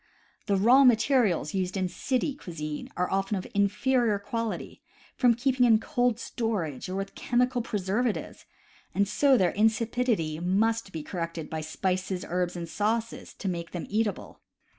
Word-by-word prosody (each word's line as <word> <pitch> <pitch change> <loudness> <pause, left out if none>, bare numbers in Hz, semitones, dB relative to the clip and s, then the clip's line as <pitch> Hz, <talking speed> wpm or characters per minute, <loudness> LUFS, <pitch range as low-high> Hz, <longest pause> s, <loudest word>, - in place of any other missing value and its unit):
The 200 - +2
raw 240 +8 +6
materials 230 - +3
used 185 0 -1
in 185 -1 0
city 255 - -1
cuisine 155 - -6
are 180 - 0
often 195 +1 0
of 185 - -5
inferior 215 +3 +2
quality, 225 +2 -4 0.3
from 245 -3 +4
keeping 255 +1 +1
in 230 -3 +6
cold 245 0 0
storage 190 - -3
or 185 - -3
with 195 0 -4
chemical 245 0 +1
preservatives; 210 +2 -2 0.6
so 265 +6 +3
their 185 -5 +3
insipidity 220 -6 +1
must 205 +4 +1
be 160 -3 -5
corrected 165 -2 -5
by 160 -1 -3
spices, 185 +3 -2
herbs, 180 +1 -1
and 170 -1 -5
sauces, 220 +6 -2
to 200 - -6
make 170 -2 -4
them 175 - -4
eatable. 215 0 -2
205 Hz, 145 wpm, -28 LUFS, 180-235 Hz, 0.6 s, raw